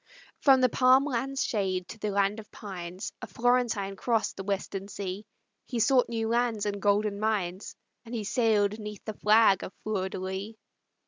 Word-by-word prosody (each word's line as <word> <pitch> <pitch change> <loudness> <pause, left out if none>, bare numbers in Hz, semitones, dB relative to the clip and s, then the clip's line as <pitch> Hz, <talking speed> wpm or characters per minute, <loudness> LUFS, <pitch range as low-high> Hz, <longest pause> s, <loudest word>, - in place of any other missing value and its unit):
From 265 -2 +5
the 255 - +6
palm 255 +2 +4
land's 270 0 -1
shade 190 -6 -1
to 225 - -9
the 210 - -2
land 200 +1 +1
of 215 - -12
pines, 185 -2 -7
A 245 - -6
Florentine 235 -5 +1
crossed 225 +2 0
the 195 - -6
Western 195 0 -3
Sea; 200 +1 -6 0.4
He 245 - -3
sought 255 +1 +4
new 225 -1 -1
lands 235 -3 +1
and 205 -1 -2
golden 205 0 +1
mines, 200 -4 -2 0.3
And 235 0 -7
he 220 - -2
sailed 210 -2 +1
'neath 210 -1 -8
the 215 - -4
flag 210 -2 +4
of - - -6
the - - -39
Fleur 195 -3 -1
de - - -6
lis. 190 +4 -5
210 Hz, 185 wpm, -28 LUFS, 195-235 Hz, 0.4 s, the